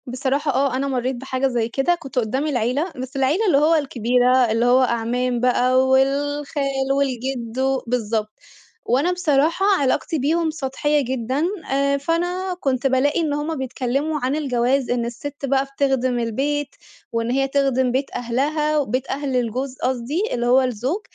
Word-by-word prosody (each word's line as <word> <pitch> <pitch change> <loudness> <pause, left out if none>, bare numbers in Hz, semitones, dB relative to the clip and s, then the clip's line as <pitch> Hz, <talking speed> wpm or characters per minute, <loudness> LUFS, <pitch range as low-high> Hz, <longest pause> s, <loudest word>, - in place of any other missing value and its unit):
بصراحة 270 +4 -1
آه 265 0 +1
أنا 270 +2 -1
مرّيت 255 -1 -1
بحاجة 260 +1 -1
زي 235 -3 -1
كده، 270 +8 +1
كنت 270 -6 -4
قدّام 260 +6 -1
العيلة 275 +5 0
بس 255 +1 -7
العيلة 280 +11 +1
اللي 350 -9 +4
هو 310 +3 +4
الكبيرة 250 -3 +2
اللي 230 +2 +1
هو 250 +2 +5
أعمام 240 +1 0
بقى 255 +1 +3
والخال 275 0 0
والجد 255 -3 -2
و 265 0 +1
بالضبط، 220 -3 -1 0.5
وأنا 275 +9 +2
بصراحة 335 +1 +1 0.2
علاقتي 285 +4 0
بيهُم 320 +4 +1
سطحية 295 0 0
جدًا، 260 +4 -1 0.5
فأنا 355 +5 -1
كنت 265 -3 0
بالاقي 270 +4 +2
إن 305 -3 -1
هُم 295 +2 -2
بيتكلّموا 265 +4 -2
عن 260 +3 0
الجواز 260 -2 0
إن 240 -1 0
الست 275 +4 -6
بقى 275 0 +1
بتخدم 265 -3 0
البيت، 275 +5 -2 0.4
وإن 230 0 -1
هي 270 +1 +1
تخدم 270 -2 +1
بيت 265 +3 -1
أهلها 295 +5 0
بيت 255 +2 -3
أهل 275 -1 -2
الجوز 255 +2 -2
قصدي، 260 - -1
اللي 240 -1 -1
هو 250 +2 +5
الزوج، 255 - -2
265 Hz, 155 wpm, -21 LUFS, 250-290 Hz, 0.5 s, هو